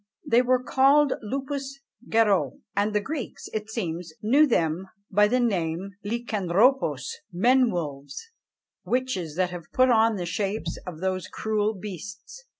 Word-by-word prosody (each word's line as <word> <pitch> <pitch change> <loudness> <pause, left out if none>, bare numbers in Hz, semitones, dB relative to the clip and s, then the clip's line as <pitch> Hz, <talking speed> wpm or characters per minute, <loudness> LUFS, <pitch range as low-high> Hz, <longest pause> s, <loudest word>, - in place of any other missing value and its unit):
They 235 +1 +5
were 255 0 +2
called 275 +3 +4
loups 275 +3 -4 0.3
garoux; 200 - +3 0.2
and 205 +1 +1
the - - +4
Greeks, 280 +1 -5
it 215 0 -3
seems, 175 -6 -4
knew 280 +8 +5
them 170 - 0 0.2
by 210 +2 +5
the 250 +4 +1
name 190 -5 -1
of 205 - -5
[Greek: 235 +2 -3
lukanthrôpoi], 195 - +2 0.3
men 245 +7 +4
wolves: 145 - -5 0.5
witches 240 -12 -2
that 180 0 0
have 175 -2 -9
put 255 0 +4
on 225 -1 +4
the 180 -3 -3
shapes 200 +4 -2
of 170 -2 -7
those 185 -1 -1
cruel 215 0 -1
beasts. 205 - -9
210 Hz, 150 wpm, -26 LUFS, 180-250 Hz, 0.5 s, They